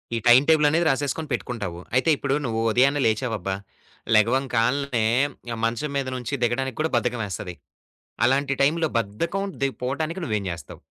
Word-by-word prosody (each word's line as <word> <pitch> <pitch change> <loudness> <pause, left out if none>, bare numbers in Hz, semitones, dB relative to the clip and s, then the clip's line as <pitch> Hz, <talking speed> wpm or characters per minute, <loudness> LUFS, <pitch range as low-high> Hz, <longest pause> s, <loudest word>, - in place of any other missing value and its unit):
ఈ - - 0
time 125 +3 +8
table 150 -2 +5
అనేది 165 +2 +2
రాసేసుకొని 145 +3 -1
పెట్టుకుంటావు. 105 -8 -4 0.2
అయితే 130 +6 +3
ఇప్పుడు 140 0 0
నువ్వు 115 -1 -1
ఉదయాన్నే 135 +4 +3
లేచావు 110 +1 0
అబ్బా! 95 0 -2 0.6
లెగవంకాల్నే 125 +1 +2 0.6
మంచం 120 +6 -2
మీద 135 -1 -1
నుంచి 125 +2 -5
దిగడానికి 125 +1 -1
కూడా 160 - 0
బద్ధకమేస్తది. 105 -7 -3 0.7
అలాంటి 135 +2 +2
టైంలో 160 +3 +2
బద్ధకం 170 - -2 0.2
ది 135 - +3
పోటానికి 155 +8 -2
నువ్వేం 105 -5 -2
జేస్తావు? 85 -4 -8
130 Hz, 140 wpm, -24 LUFS, 115-145 Hz, 0.7 s, time